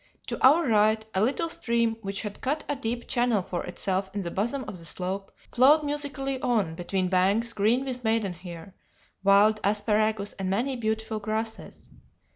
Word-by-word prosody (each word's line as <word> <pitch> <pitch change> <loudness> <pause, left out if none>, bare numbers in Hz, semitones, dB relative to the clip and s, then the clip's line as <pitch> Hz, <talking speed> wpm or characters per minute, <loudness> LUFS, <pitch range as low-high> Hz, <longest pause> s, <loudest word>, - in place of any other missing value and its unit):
To - - -5
our 295 +5 +6
right 220 0 +3
a 190 - +1
little 275 +9 +1
stream, 235 -4 +1
which 195 0 -3
had 205 -1 -7
cut 295 +4 -1
a 290 - -1
deep 235 -1 -4
channel 240 -5 +1
for 175 -1 -4
itself 190 +1 -1
in 205 - -1
the 170 -2 -4
bosom 235 +9 -1
of 195 -4 -7
the 165 - -12
slope, 190 +4 -3 0.2
flowed 285 +5 +6
musically 285 -2 -3
on 220 -10 +1
between 185 +2 -2
banks 195 +6 +2
green 230 +6 +2
with 250 -2 -4
maidenhair, 190 -5 -3 0.5
wild 205 +2 +5
asparagus, 210 0 +1
and 190 -1 -2
many 245 +8 0
beautiful 220 -1 -2
grasses. 220 +1 -5
220 Hz, 165 wpm, -27 LUFS, 195-245 Hz, 0.5 s, our